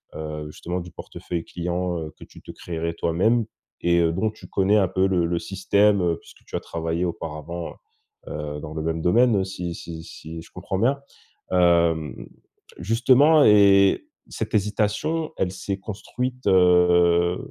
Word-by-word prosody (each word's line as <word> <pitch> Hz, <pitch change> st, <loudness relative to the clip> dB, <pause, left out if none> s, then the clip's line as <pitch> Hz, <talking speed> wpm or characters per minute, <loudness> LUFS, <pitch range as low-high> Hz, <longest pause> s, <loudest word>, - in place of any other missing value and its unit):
heu, 75 Hz, -1 st, -5 dB
justement 90 Hz, +4 st, -5 dB
du 90 Hz, 0 st, -8 dB
portefeuille 85 Hz, 0 st, -6 dB
clients, 90 Hz, 0 st, -3 dB
heu, 80 Hz, -1 st, -6 dB
que -, -, -12 dB
tu -, -, -15 dB
te -, -, -10 dB
créerais 85 Hz, -1 st, -4 dB
toi-même 105 Hz, +9 st, +1 dB, 0.4 s
et, 85 Hz, 0 st, +3 dB
heu, 85 Hz, -1 st, +2 dB
dont 110 Hz, +5 st, 0 dB
tu 110 Hz, -, -14 dB
connais 100 Hz, +2 st, +2 dB
un 95 Hz, -3 st, +3 dB
peu 95 Hz, +1 st, +1 dB
le 90 Hz, -3 st, +1 dB
le 85 Hz, +1 st, -1 dB
système, 100 Hz, +2 st, +2 dB
heu, 85 Hz, -2 st, +1 dB
puisque -, -, -19 dB
tu -, -, -7 dB
as -, -, -2 dB
travaillé 85 Hz, +1 st, -3 dB
auparavant, 85 Hz, 0 st, -5 dB, 0.5 s
heu, 75 Hz, -1 st, -5 dB
dans 75 Hz, 0 st, -7 dB
le 80 Hz, -, -4 dB
même 80 Hz, 0 st, -2 dB
domaine, 110 Hz, +3 st, +3 dB
si 90 Hz, -3 st, -5 dB
si 80 Hz, -1 st, -8 dB
si 80 Hz, +1 st, -9 dB
je -, -, -15 dB
comprends 95 Hz, -, -4 dB
bien? 135 Hz, +6 st, +2 dB, 0.5 s
Hem, 85 Hz, -4 st, +2 dB, 0.5 s
justement 130 Hz, -, +4 dB
et 100 Hz, -, +5 dB, 0.2 s
cette 110 Hz, 0 st, -4 dB
hésitation, 105 Hz, +10 st, 0 dB
elle 90 Hz, -, 0 dB
s'est 95 Hz, +1 st, -4 dB
construite, 125 Hz, +5 st, -5 dB
heu, 90 Hz, -1 st, +4 dB
90 Hz, 160 wpm, -23 LUFS, 85-105 Hz, 0.5 s, et